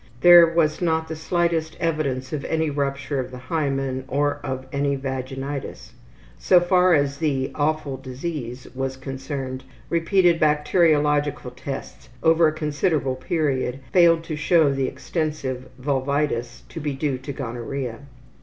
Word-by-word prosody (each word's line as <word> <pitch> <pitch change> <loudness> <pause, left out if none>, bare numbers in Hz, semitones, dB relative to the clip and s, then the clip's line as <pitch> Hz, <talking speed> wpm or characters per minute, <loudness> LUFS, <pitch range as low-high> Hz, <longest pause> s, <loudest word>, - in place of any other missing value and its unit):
There 175 0 +9
was 165 -1 +1
not 160 -2 +1
the 160 - -3
slightest 165 0 -1
evidence 145 -5 -1
of 145 -2 -3
any 160 -1 0
rupture 140 0 -2
of 125 -1 -3
the 130 - -9
hymen 135 -2 -2
or 145 +1 0
of 130 -1 -4
any 140 0 +1
vaginitis. 135 +1 -5 0.5
So 180 - +5
far 180 0 +4
as 140 -1 +1
the 140 -5 0
``awful 145 -3 -1
disease'' 130 -2 -5
was 135 0 -3
concerned, 135 0 -5 0.3
repeated 170 0 +3
bacteriological 150 -3 +2
tests 135 +2 -7
over 165 0 +5
a - - +2
considerable 150 -3 0
period 130 -2 -1
failed 170 -2 +5
to 165 -2 -4
show 155 -1 +3
the 135 -1 0
extensive 135 -2 -3
vulvitis 135 -2 -1
to 165 - -7
be 145 -2 -2
due 135 -2 -1
to 130 +2 -6
gonorrhea. 125 -1 -5
145 Hz, 135 wpm, -23 LUFS, 130-160 Hz, 0.5 s, There